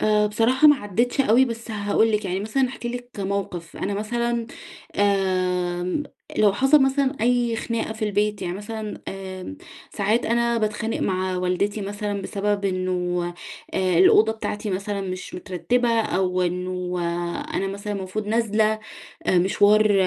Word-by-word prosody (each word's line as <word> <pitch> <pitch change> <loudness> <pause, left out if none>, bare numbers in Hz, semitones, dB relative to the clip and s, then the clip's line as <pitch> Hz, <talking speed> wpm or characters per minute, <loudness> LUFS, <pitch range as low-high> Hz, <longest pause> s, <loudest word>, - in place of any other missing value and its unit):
آآ، 210 0 +3
بصراحة 235 +8 +4
ما 295 - +7
عديتش 240 +3 0
أوي، 255 0 +5
بس 230 -2 -6
هاقول 215 +1 +1
لِك 210 0 0
يعني 190 0 -1
مثلًا 255 +6 +1
هاحكي 245 -2 -6
لِك 245 0 -6
موقف: 190 -4 -3
أنا 200 - -2
مثلًا 235 +2 -1 0.5
آمم، 185 0 +1 0.4
لو 210 -2 +5
حصل 270 +7 +5
مثلًا 270 +1 +1
أي 240 0 +2
خناقة 230 -1 -2
في 220 0 -3
البيت، 210 0 0
يعني 175 - -2
مثلًا 215 +1 -6
آمم، 190 +6 -7 0.4
ساعات 215 +4 +1
أنا 235 0 +2
باتخانق 220 +1 -1
مع 185 -1 0
والدتي 185 +4 0
مثلًا 205 0 -3
بسبب 200 +1 -1
إنه 180 -2 -1 0.5
آآ 185 -2 +2
الأوضة 215 +4 +6
بتاعتي 210 -1 -4
مثلًا 200 +2 -2
مش 185 -1 -5
مترتبة، 230 +6 0
أو 185 -3 0
إنه 180 0 -2 0.6
أنا 195 - 0
مثلًا 200 +2 -4
المفروض 200 +1 -4
نازلة 220 -1 +2 0.5
آآ 180 - +4
مشوار 205 +3 +4
205 Hz, 145 wpm, -23 LUFS, 185-230 Hz, 0.6 s, ما